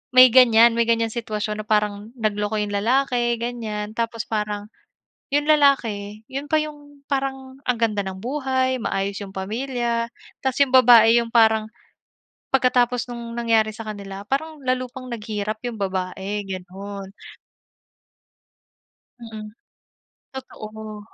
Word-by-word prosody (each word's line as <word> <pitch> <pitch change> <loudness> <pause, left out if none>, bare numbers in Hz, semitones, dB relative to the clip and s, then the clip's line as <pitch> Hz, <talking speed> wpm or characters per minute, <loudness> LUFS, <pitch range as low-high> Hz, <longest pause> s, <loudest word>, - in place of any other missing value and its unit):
may 255 0 +10
ganyan 235 -2 +7
may 235 - +3
ganyan 230 0 +3
sitwasyon 215 -2 -3
na - - -29
parang 210 0 0
nagloko 210 0 -1
yung 205 -1 -3
lalaki 240 +2 +1
ganyan. 220 -3 -4
Tapos 230 -1 -2
parang 210 -1 -2 0.7
yung 290 +1 +2
lalaki, 225 -9 +2
yun 275 +2 -4
pa 310 - +4
yung 290 -2 -9
parang 270 -1 -3
ang 250 -2 +1
ganda 215 -3 +1
ng 190 0 -6
buhay 260 -1 0
maayos 195 -1 -2
yung 195 -1 -9
pamilya 235 +3 -2 0.4
tas 265 -1 -1
yung 275 - +2
babae 235 -2 +8
yung 230 - -7
parang 220 -2 +5 0.9
pagkatapos 250 -2 +2
nung 235 -1 -6
nangyari 225 -2 +2
sa 225 - -7
kanila 200 -2 -7
parang 310 +5 -2
lalo 255 0 0
pang 255 0 -9
naghirap 215 -1 -4
yung 240 - -4
babae, 190 +1 -3
gano'n. 195 +1 -7 2.1
Mm. 220 -2 -9 0.8
Totoo. 215 -5 -8
230 Hz, 130 wpm, -23 LUFS, 210-255 Hz, 2.1 s, may